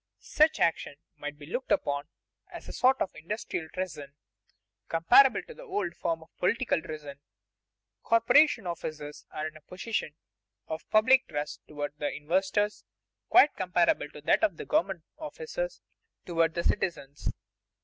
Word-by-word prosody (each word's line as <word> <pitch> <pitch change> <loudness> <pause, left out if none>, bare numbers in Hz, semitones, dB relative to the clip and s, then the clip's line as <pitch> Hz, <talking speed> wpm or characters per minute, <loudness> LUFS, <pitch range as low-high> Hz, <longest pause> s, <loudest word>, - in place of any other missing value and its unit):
Such 310 +1 +2
action 165 -3 +1 0.2
must 145 0 -6
be 145 - -11
looked 245 - -4
upon 145 - +1 0.4
as - - -9
a - - -7
sort 260 +1 +3
of 185 - -7
industrial 165 -1 -5
treason, 155 -7 -6 0.7
comparable 165 +11 +5
to 480 - -11
the - - -13
old 410 - -3
form 165 -2 -2
of 160 - -25
political 230 0 +1
treason. 150 -3 -8 0.8
Corporation 230 +1 +4
officers 155 -3 -6
are 155 - -4
in 155 - -10
a 155 - -13
position 180 -3 -4 0.5
of 160 - -6
public 255 +5 +5
trust 150 0 -4
toward 145 -1 -4
the 145 - -1
investors 190 +6 0 0.5
quite 355 -5 +7
comparable 175 -4 +1
to 150 - -12
that 145 - +2
of 180 -6 +2
government 180 -2 0 0.2
officers 475 +10 -5 0.4
toward 165 -2 +1
the 170 - -1
citizens. 145 -8 -1
170 Hz, 140 wpm, -29 LUFS, 150-230 Hz, 0.8 s, quite